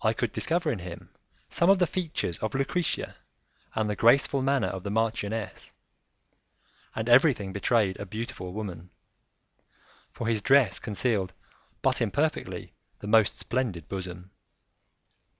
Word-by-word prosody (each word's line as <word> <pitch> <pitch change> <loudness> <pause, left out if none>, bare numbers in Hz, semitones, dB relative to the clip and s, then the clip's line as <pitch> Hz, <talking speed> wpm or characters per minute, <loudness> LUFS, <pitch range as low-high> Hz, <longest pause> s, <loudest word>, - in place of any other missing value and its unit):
I 110 0 +3
could 120 +1 -2
discover 165 -1 0
in 115 - -3
him 85 -1 -9 0.4
some 170 - +2
of 195 - +7
the 180 - +3
features 160 - -3
of 110 +1 -3
Lucrezia 145 +4 -1 0.6
and 110 -1 +1
the 105 - -1
graceful 135 +5 +4
manner 135 0 +2
of 95 - -5
the 100 - -5
marchioness, 110 0 -2 1.2
and 110 +1 -2
everything 120 -6 +4
betrayed 100 -1 +1
a 100 - -4
beautiful 105 -3 -5
woman, 90 -4 -6 1.2
for 115 - -6
his 110 -2 +1
dress 135 +2 +4
concealed 105 -3 -1 0.5
but - - +2
imperfectly - - -1 0.2
the - - -10
most 110 0 +4
splendid 110 - -2
bosom. 90 -1 -6
110 Hz, 130 wpm, -28 LUFS, 95-130 Hz, 1.2 s, of